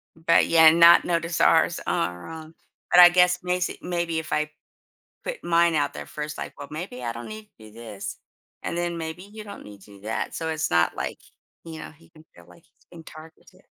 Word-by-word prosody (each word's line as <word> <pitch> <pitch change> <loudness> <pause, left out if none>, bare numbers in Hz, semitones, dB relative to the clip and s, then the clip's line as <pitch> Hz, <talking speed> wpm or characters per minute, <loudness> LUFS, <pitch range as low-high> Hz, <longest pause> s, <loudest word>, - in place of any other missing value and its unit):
M 165 - -22
but, 165 - +5
yeah, 160 -1 +7
not 170 +1 +7
notice 170 -1 -1
ours - - +3
are, 90 +1 -2
uh 160 -1 -9 0.4
but 175 - +6
I 175 0 +11
guess 180 0 +3
macy 180 0 -2
maybe 170 -2 -2
if 160 - -9
I 150 0 -1 0.7
put - - -6
mine 170 0 +2
out 150 - 0
there - - -8
first, 150 0 -7
I - - -6
"Well 145 - -9
maybe 155 -5 -7
I 120 -1 -3
don't 120 +1 -8
need 215 0 -10
to - - -47
do 110 -1 -15
this, 110 -3 -8 0.5
and 170 - -4
then 175 0 -2
maybe 160 +2 -6
you 215 +2 -11
don't 205 - -11
need 100 -1 -13
to - - -17
do - - -18
that." 110 +2 -4
So, 160 - -4
it's 160 0 -2
not, 85 0 +2
like, - - -5 0.5
you 160 -1 -9
know, - - -9
he 160 +1 -22
can 155 -1 -19
feel, 85 -1 -17
like, 90 0 -19
he's - - -34
being 170 -2 -12
targeted. 160 +1 -15
160 Hz, 220 wpm, -24 LUFS, 145-175 Hz, 0.7 s, I